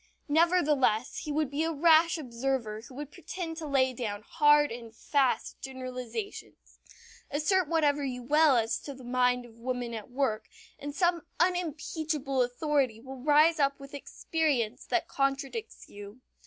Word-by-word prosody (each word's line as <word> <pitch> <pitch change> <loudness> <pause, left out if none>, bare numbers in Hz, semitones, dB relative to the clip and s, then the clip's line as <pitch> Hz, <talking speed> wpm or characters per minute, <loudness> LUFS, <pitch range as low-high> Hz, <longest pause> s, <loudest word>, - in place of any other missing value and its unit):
Nevertheless, 295 -8 +2
he 300 - -5
would 300 -2 0
be 295 +3 0
a 325 - 0
rash 325 +1 +5
observer 240 -5 -3
who 255 +3 -13
would 295 +1 -7
pretend 330 0 -6
to 320 -2 -5
lay 260 -2 +2
down 215 -4 -4
hard 295 +1 +4
and 230 -1 -8
fast 270 -1 0
generalizations. 255 - -7 0.5
Assert 310 +5 +1
whatever 295 -3 +2
you 250 -2 -4
will 300 +2 +4
as 225 -1 +1
to 280 - -8
the 260 - -13
mind 250 0 +1
of 235 - -15
woman 245 -1 -3
at 220 0 -7
work 245 -4 -1 0.3
and 290 0 -6
some 345 -2 +1
unimpeachable 315 -5 -1
authority 255 -2 0
will 260 +1 -10
rise 305 +3 +4
up 275 0 +2
with 275 0 -12
experience 285 -5 -1
that - - 0
contradicts 275 +11 -2
you. 205 +3 -11
275 Hz, 150 wpm, -29 LUFS, 250-310 Hz, 0.5 s, rash